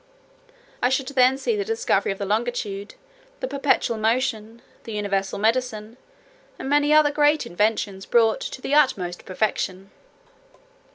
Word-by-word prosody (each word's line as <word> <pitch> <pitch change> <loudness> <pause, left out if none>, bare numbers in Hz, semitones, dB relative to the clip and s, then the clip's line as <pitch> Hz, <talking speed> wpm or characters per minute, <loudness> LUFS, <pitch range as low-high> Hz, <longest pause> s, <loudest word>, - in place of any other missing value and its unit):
I - - +3
should 265 +1 -1
then 260 -1 +3
see 440 - -1
the 410 - -1
discovery 450 - 0
of 195 - -5
the 200 - -4
longitude, 210 -2 -3 0.4
the - - -3
perpetual 270 - 0
motion, 225 0 -1 0.2
the 225 - -7
universal 195 -2 -2
medicine, 225 0 -1 0.6
and - - -6
many 290 +1 +2
other 305 -1 +5
great 295 -1 +2
inventions, 205 -1 -1
brought 225 -2 +3
to 260 - -6
the 280 - -2
utmost 195 -12 +1
perfection. 195 -1 -2
230 Hz, 135 wpm, -23 LUFS, 205-275 Hz, 0.6 s, other